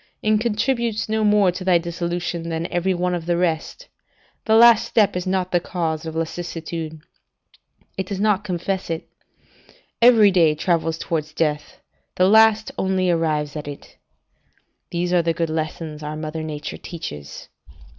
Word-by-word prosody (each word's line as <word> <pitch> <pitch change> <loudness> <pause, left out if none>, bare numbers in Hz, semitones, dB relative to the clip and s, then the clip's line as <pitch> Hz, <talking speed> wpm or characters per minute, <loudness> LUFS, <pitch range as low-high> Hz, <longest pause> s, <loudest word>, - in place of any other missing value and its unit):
it 215 0 +3
contributes 235 0 0
no 220 0 0
more 205 -3 +4
to 185 +1 -7
thy 185 -2 +4
dissolution, 170 0 -3
than 165 0 -2
every 175 +2 +1
one 180 0 0
of 170 -1 -4
the 175 -1 +1
rest: 175 - -2 0.6
the 220 - +3
last 235 -1 +7
step 210 -5 +2
is 180 +1 -3
not 185 -1 -1
the 175 - +3
cause 165 -2 -3
of 160 - -6
lassitude: 165 -1 -5 1.0
it 190 - -2
does 195 -1 -4
not 210 -1 +2
confess 185 0 -3
it. 165 -1 -4 0.9
Every 230 -4 +7
day 165 -5 +4
travels 165 0 0
towards 155 -3 -3
death; 150 -2 -2 0.3
the 185 - +4
last 220 +1 +5
only 190 -1 +1
arrives 155 -3 -1
at 150 -1 -6
it." 145 -1 -10 0.9
These 175 +1 -2
are 175 - +4
the 165 0 0
good 165 -1 -1
lessons 155 -1 -4
our 150 0 -5
mother 155 +1 -5
Nature 150 -1 -5
teaches. 75 - -8
175 Hz, 155 wpm, -22 LUFS, 160-195 Hz, 1.0 s, last